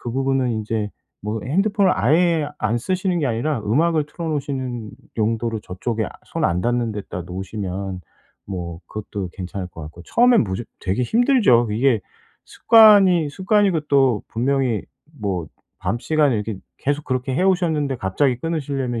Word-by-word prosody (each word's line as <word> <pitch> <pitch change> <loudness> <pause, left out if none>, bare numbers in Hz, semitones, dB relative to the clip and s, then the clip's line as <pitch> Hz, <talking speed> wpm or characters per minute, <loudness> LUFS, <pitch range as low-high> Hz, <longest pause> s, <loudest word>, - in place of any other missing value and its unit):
그 120 - -5
부분은 135 -1 +1
인제 110 -1 -2 0.3
뭐 105 +1 -2
핸드폰을 195 +5 +2
아예 155 - +2
안 110 +2 0
쓰시는 185 - -1
게 140 - +1
아니라 120 +3 -1
음악을 150 +8 +1
틀어 165 +2 -7
놓으시는 130 -7 -3 0.3
용도로 115 0 -1
저쪽에 110 +5 -3
아 - - -8
손 - - -3
안 90 +1 +1
닿는 120 -1 0
데다 100 -3 -6
놓으시면 95 +1 -5 0.5
뭐 85 -3 -5
그것도 100 -3 -5
괜찮을 95 0 -5
것 80 - -10
같고. 80 +3 -10
처음엔 240 - +4
무조 95 +3 -4 0.2
되게 95 +6 -1
힘들죠. 215 - +4
이게 120 0 +2 0.4
습관이 200 -8 +6
습관이고 190 +1 +2
또 135 -6 +3
분명히 125 -2 0 0.4
뭐 95 -6 -2 0.4
밤 105 +6 0
시간에 150 -3 +2
이렇게 105 -1 -3 0.2
계속 145 +2 -1
그렇게 130 0 -2
해오셨는데 165 -6 +1
갑자기 125 +7 +1
끊으시려면 135 -6 -2
125 Hz, 335 characters per minute, -21 LUFS, 105-155 Hz, 0.5 s, 습관이